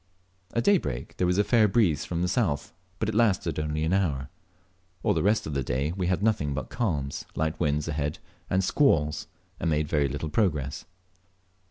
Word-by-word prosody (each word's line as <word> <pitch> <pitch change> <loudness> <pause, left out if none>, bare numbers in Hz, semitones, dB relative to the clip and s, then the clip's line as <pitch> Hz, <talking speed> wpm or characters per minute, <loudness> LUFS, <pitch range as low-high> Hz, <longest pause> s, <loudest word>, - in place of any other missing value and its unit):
At 115 - +2
daybreak 175 - +1
there 90 - +2
was 90 +1 +2
a 105 - +4
fair 110 -1 +4
breeze 95 -9 +2
from 85 0 -2
the - - +1
south, 85 - 0 0.2
but 110 - -1
it 110 - -1
lasted 105 -7 +2
only 75 0 -1
an 80 +3 +1
hour. 75 -8 0 0.7
All - - +3
the - - 0
rest 105 +3 +2
of 75 - -4
the 70 - 0
day 65 +4 -1
we 90 0 -2
had 95 +2 0
nothing 80 -11 +1
but 65 - -5
calms, 75 - -2
light 80 +1 -1
winds 75 -2 0
ahead, 75 -1 -2 0.3
and 95 +1 +2
squalls, 80 - +2 0.3
and - - 0
made 75 -1 +1
very 75 -2 +2
little 70 +3 -4
progress. 75 -10 0
80 Hz, 190 wpm, -27 LUFS, 75-100 Hz, 0.7 s, a